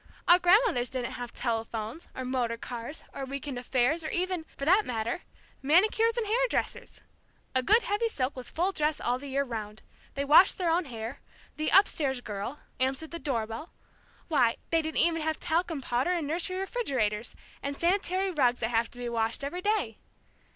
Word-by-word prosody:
Our 350 +1 +8
grandmothers 360 - +4
didn't 250 -2 -3
have 245 -1 -6
telephones, 225 +3 -3
or 260 - -4
motor 245 -2 -1
cars, 240 +5 -6
or 275 - -5
week 275 +1 -5
end 260 -3 -3
affairs, 255 +6 +1
or 310 - -3
even 360 -2 -2
for 275 - -3
that 380 +7 +5
matter 235 - -2 0.4
manicures 435 - +3
and 465 - 0
hair 485 +4 +2
dressers! - - -3 0.5
A 260 - +3
good 435 - +4
heavy 435 +3 0
silk 265 -8 -2
was 255 -2 -5
full 360 +4 0
dress 305 -4 0
all 245 +1 0
the 285 - -8
year 275 +1 0
'round. 215 -4 -6 0.3
They 280 +1 -1
washed 310 +6 +7
their 350 -3 +1
own 340 +1 +2
hair. 230 0 -6 0.4
The 310 0 0
'up 390 +2 +7
stairs 265 -4 -1
girl' 210 +4 -5 0.2
answered 265 +5 -1
the 335 - -5
doorbell, 230 +1 -3 0.5
why, 255 -8 +3
they 330 -1 +4
didn't 315 0 0
even 330 -1 +2
have 315 0 -1
talcum 330 -2 0
powder 245 +6 0
and 340 -4 -1
nursery 355 +5 -2
refrigerators, 260 - -1 0.3
and 280 0 -4
sanitary 375 +1 +1
rugs 250 -7 +2
that 225 - 0
have 230 -1 +1
to - - -13
be 245 0 -4
washed 230 +2 -1
every 345 +6 -3
day! 425 +2 0
280 Hz, 185 wpm, -29 LUFS, 245-350 Hz, 0.5 s, Our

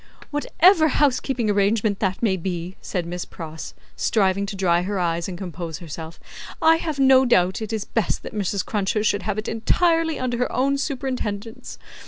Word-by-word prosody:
"Whatever 315 +3 +4
housekeeping 265 -4 +1
arrangement 205 0 +1
that 190 +2 -1
may 200 -5 +3
be," 180 0 -4
said 180 -3 -3
Miss 175 +1 -4
Pross, 160 -2 -8 0.2
striving 200 -2 +1
to 200 - -5
dry 175 -3 +2
her 200 +2 -2
eyes 170 -2 -1
and 180 - -6
compose 170 -3 -6
herself, 165 -1 -8 0.4
"I 325 0 +5
have 315 -3 -4
no 265 -1 +6
doubt 190 -6 +2
it 220 0 -4
is 220 -2 -2
best 225 -5 -1
that - - -8
Mrs. 200 -2 -1
Cruncher 210 0 -1
should 205 -1 +1
have 210 -1 -2
it 215 - -3
entirely 325 +7 +1
under 245 -2 -2
her 250 - 0
own 275 +2 +1
superintendence. 250 -6 -4
210 Hz, 175 wpm, -23 LUFS, 185-260 Hz, 0.4 s, no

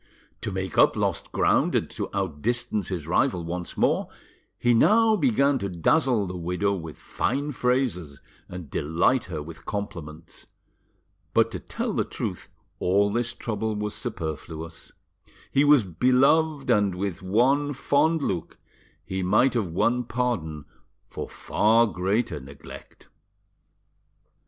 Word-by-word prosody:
To 110 - -3
make 95 -2 -2
up - - +6
lost - - -2
ground - - +2
and - - +1
to - - -4
outdistance 100 +4 -2
his 90 -6 -4
rival 90 +1 +1
once 90 +1 -5
more, - - +1 0.5
he 120 0 +2
now 220 - +5
began 140 - +2
to 100 - -3
dazzle 110 - +2
the 90 0 -6
widow 90 +3 -1
with 80 -5 -6
fine 140 +4 -2
phrases 125 - -1 0.3
and 90 -3 -7
delight 85 - +1
her 80 -5 -5
with 80 +1 -11
compliments; 85 -6 -7 0.9
but - - +4
to - - -4
tell - - -4
the - - +1
truth - - -5 0.3
all 100 +2 +2
this 120 +1 -1
trouble 110 -1 -3
was 105 0 -3
superfluous; 80 - -6 0.6
he 140 - +4
was 145 -4 +6
beloved, 135 - +2
and 100 -3 +2
with 95 -1 -3
one 130 +10 +2
fond 145 +3 +1
look 90 -9 -3 0.5
he 95 0 -3
might 105 +8 +3
have 115 -6 0
won 115 +9 +1
pardon 110 - -2 0.4
for - - -7
far 115 +2 +3
greater 95 -3 -1
neglect. 70 +1 -13
100 Hz, 130 wpm, -25 LUFS, 85-125 Hz, 0.9 s, up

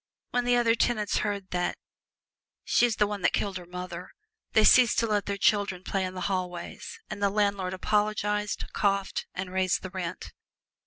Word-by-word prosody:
When 245 0 0
the 245 0 +3
other 235 -1 +4
tenants 215 -2 +1
heard 200 -2 -3
that 180 0 -1 0.9
"she's 240 -2 +3
the 210 - +3
one 205 -1 -4
that - - +2
killed 195 -2 -1
her 175 - -12
mother," 180 0 -7 0.4
they 220 - +5
ceased 245 +1 +6
to - - +3
let 210 -3 0
their 200 0 -2
children 200 -3 +1
play 195 0 -1
in 185 0 -6
the 185 - -5
hallways, 180 -2 -4
and 210 -1 -5
the 200 - +3
landlord 200 -2 0
apologized, 210 +1 0
coughed, 200 -1 0
and 185 0 -4
raised 185 -1 +1
the 185 - -6
rent. 180 -1 -5
200 Hz, 175 wpm, -28 LUFS, 185-210 Hz, 0.9 s, ceased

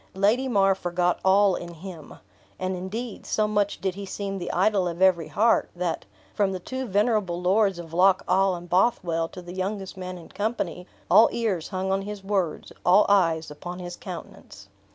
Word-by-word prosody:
Lady 215 +7 +2
mar 195 -5 +4
forgot 180 -1 0
all 195 +1 +5
in 170 0 -7
him. 165 -2 -10 0.4
And, 185 0 -2
indeed, 205 +5 -5
so 215 -1 +1
much 205 -1 0
did 190 +1 -1
he 200 +2 -7
seem 195 0 -4
the 175 - -4
idol 190 0 +2
of 170 0 -5
every 185 -4 +4
heart, 225 +2 +2
that, 175 -2 -2 0.3
from 200 -2 +1
the 185 - -4
two 260 +7 -5
venerable 205 -3 +1
lords 195 +1 +2
of 165 -2 -9
Loch 185 +2 +4
awe 190 +1 +3
and 175 0 -9
Bothwell 175 -3 +1
to 180 - -10
the 175 0 -9
youngest 190 +1 -4
man 185 0 -6
in 170 - -13
company, 190 -4 -3 0.2
all 225 - +8
ears 205 -9 -1
hung 190 0 -2
on 195 0 +1
his 205 0 -7
words, 195 -5 -2
all 190 +4 +6
eyes 165 -6 +2
upon 175 +4 -7
his 175 -1 -6
countenance. 170 - -10
190 Hz, 185 wpm, -25 LUFS, 175-205 Hz, 0.4 s, all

